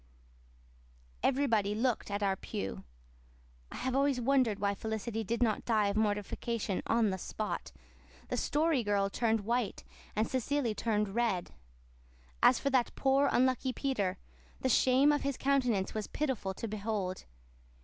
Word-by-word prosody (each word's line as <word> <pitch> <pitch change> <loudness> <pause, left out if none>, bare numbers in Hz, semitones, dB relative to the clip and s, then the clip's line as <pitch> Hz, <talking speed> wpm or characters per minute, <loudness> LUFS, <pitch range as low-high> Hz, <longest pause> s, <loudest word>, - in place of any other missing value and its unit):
Everybody 230 -7 +2
looked 235 0 0
at 205 +1 -2
our 195 -1 +2
pew. 95 - -5 0.9
I - - -7
have 260 0 -2
always 275 -1 +2
wondered 250 -4 +2
why 200 0 0
Felicity 220 +2 -3
did 235 +4 0
not 220 -3 +1
die 215 -3 +2
of 200 - -2
mortification 210 0 -1
on 225 -3 +3
the 190 - -3
spot. 215 +4 -4 0.6
The - - -1
Story 305 -2 +1
Girl 200 -1 +1
turned 225 -1 +1
white, 235 +1 -1 0.3
and 215 +1 +1
Cecily 260 -2 0
turned 210 -2 -1
red. 225 -6 0 0.9
As 255 - +6
for 280 - -1
that 255 -2 +1
poor, 275 +1 +3
unlucky 255 0 +2
Peter, 205 -11 -1 0.4
the 260 - +1
shame 260 +4 +5
of 290 - +1
his 275 -2 -2
countenance 250 -8 +1
was 215 -1 -3
pitiful 250 -10 -2
to 230 - -4
behold. 205 -3 -3
225 Hz, 145 wpm, -32 LUFS, 205-260 Hz, 0.9 s, As